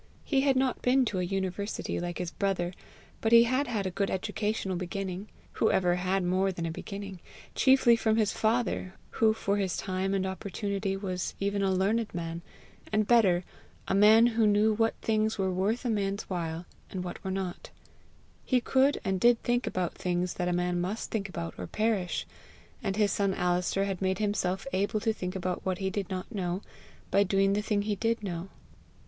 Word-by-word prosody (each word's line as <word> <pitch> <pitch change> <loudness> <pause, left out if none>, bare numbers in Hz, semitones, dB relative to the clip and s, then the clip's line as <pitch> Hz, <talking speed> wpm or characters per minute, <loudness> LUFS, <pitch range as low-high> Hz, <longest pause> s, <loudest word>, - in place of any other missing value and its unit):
He 275 -3 +2
had 270 -1 +3
not 260 -1 +1
been 255 +1 +3
to 205 -5 -1
a - - 0
university 195 +2 -2
like 175 0 -4
his 175 -2 -3
brother, 185 -3 -1 0.5
but 225 - +1
he 235 0 +9
had 255 +4 +1
had 215 -5 -2
a 185 - -1
good 195 +2 -1
educational 205 0 -2
beginning 185 +2 -4 0.2
who 220 - +1
ever 180 -2 +3
had 185 +1 0
more 185 +2 +1
than 170 -2 -4
a 165 - -2
beginning? 195 +2 -7 0.3
chiefly 260 -3 +5
from 220 -1 +1
his 215 -2 +2
father, 220 -4 0 0.2
who 220 -1 +6
for 205 -2 -1
his 190 -4 -1
time 190 +1 -1
and 190 -1 0
opportunity 195 +1 -3
was 185 -2 -3
even 200 0 0
a 195 - +2
learned 205 +3 0
man 165 0 -4 0.5
and 215 0 +2
better, 200 -6 +4 0.4
a - - 0
man 215 +3 +7
who 230 -2 +3
knew 210 +1 +4
what 225 +1 +1
things 220 0 +1
were 190 -1 0
worth 205 +7 0
a - - +1
man's 200 -2 -1
human 185 - -5
while, 165 0 -3 0.2
and 185 -2 -4
what 180 - -7
were 190 - -3
not: 190 -2 -4 0.7
he 255 - +2
could 270 +3 +2
and 190 -1 0
did 240 +3 +5
think 240 +1 +1
about 180 -2 -1
things 180 0 -1
that 180 - -2
a - - +1
man 175 0 0
must 195 +5 -3
think 200 -3 -2
about 170 -2 -5
or - - -4
perish; 215 -5 0 0.6
and 195 - -1
his 210 -1 +2
son 195 -2 +1
Alister 180 +2 +1
had 195 -2 -3
made 190 -1 +1
himself 195 -3 -1
able 200 +3 +1
to 225 +1 +1
think 180 -3 -5
about 185 -1 -2
what 185 -1 -1
he 190 0 -2
did 195 -2 -3
not 185 +5 -5
know, 185 -1 -2 0.5
by 200 - +4
doing 195 0 +3
the 205 - +1
thing 205 -1 0
he 210 0 -1
did 230 +1 -1
know. 180 -1 -4
195 Hz, 200 wpm, -29 LUFS, 185-220 Hz, 0.7 s, he